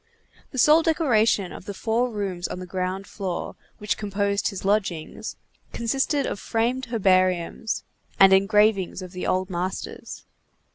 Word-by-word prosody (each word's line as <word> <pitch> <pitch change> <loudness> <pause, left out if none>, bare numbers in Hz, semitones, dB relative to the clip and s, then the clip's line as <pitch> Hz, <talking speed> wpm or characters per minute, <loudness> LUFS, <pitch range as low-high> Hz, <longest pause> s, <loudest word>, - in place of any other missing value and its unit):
The 265 - -9
sole 300 +5 +6
decoration 230 - +2
of - - -10
the 200 - -6
four 235 +4 0
rooms 195 -5 -3
on - - -6
the 185 - -6
ground 185 +1 -3
floor, 190 -4 -5 0.2
which 210 - -2
composed 200 -1 -1
his 195 -2 -5
lodgings, 195 -6 -1 0.4
consisted 270 +4 0
of - - -3
framed 240 +5 -1
herbariums, 185 -2 +1 0.4
and 195 0 +8
engravings 195 -1 +3
of 180 - -9
the 180 -1 -4
old 185 0 0
masters. 180 +2 -5
200 Hz, 140 wpm, -24 LUFS, 185-225 Hz, 0.4 s, and